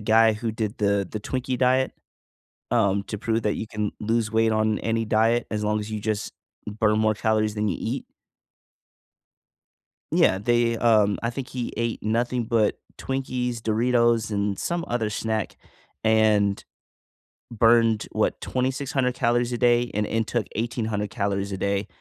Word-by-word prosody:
guy 110 +1 +4
who 115 +1 -3
did 110 -1 -3
the 100 -2 +1
the 110 - -4
Twinkie 130 +2 -2
diet, 130 +1 +2 0.8
um, 100 -4 +2
to 105 - -5
prove 115 0 -1
that 105 - 0
you - - -4
can 105 -1 -3
lose 110 0 0
weight 115 0 +2
on 110 0 +1
any 115 0 -1
diet 115 +2 +2
as 105 -1 -2
long 105 0 +1
as 105 - -6
you 110 - -3
just 110 0 -2 0.3
burn 105 0 +1
more 110 0 +2
calories 110 0 0
than 105 - 0
you 90 - -1
eat. - - -3 2.1
Yeah, 95 - +4
they, 120 +2 +2
um, 105 -3 +3
I 115 - 0
think 130 +1 -6
he 125 -2 -4
ate 115 0 -2
nothing 120 +2 0
but 110 -2 +1 0.2
Twinkies, 130 -2 -2
Doritos, 115 0 +2
and 100 -1 -1
some 170 0 -2
other 115 -3 -1
snack 110 0 -2 0.5
and 110 -2 +3 0.9
burned, 115 -1 +3
what, - - 0
2,600 130 0 -1
calories 120 0 +1
a 120 - -1
day 120 0 +3
and 105 +1 0
and 110 0 -1
took 120 -4 -1
1,800 110 -3 -2
calories 100 -2 -2
a 95 - -3
day, 100 +1 -1
110 Hz, 160 wpm, -24 LUFS, 105-120 Hz, 2.1 s, guy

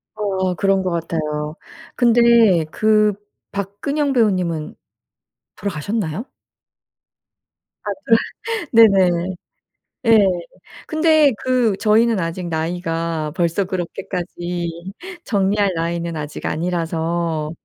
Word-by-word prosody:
어 190 -3 -1
그런 195 0 +2
것 185 - 0
같아요. 155 -2 -3 0.4
근데 235 -7 +5
그 215 -1 +3 0.4
박근형 270 +9 -2
배우님은 185 -10 0 0.8
돌아가셨나요? 200 - -3 1.6
아 - - -2 0.6
그렇 445 -6 -2 0.2
네네. 185 -2 +2 0.7
예. 225 -1 +7 0.7
근데 310 -3 +4
그 250 -5 +2
저희는 225 0 +3
아직 170 +1 -3
나이가 165 -1 -2
벌써 170 +3 +1
그렇게까지 175 -1 -5 0.3
정리할 200 -1 +1
나이는 170 0 -2
아직 150 -1 -5
아니라서 165 -1 -1
185 Hz, 200 characters per minute, -20 LUFS, 165-215 Hz, 1.6 s, 예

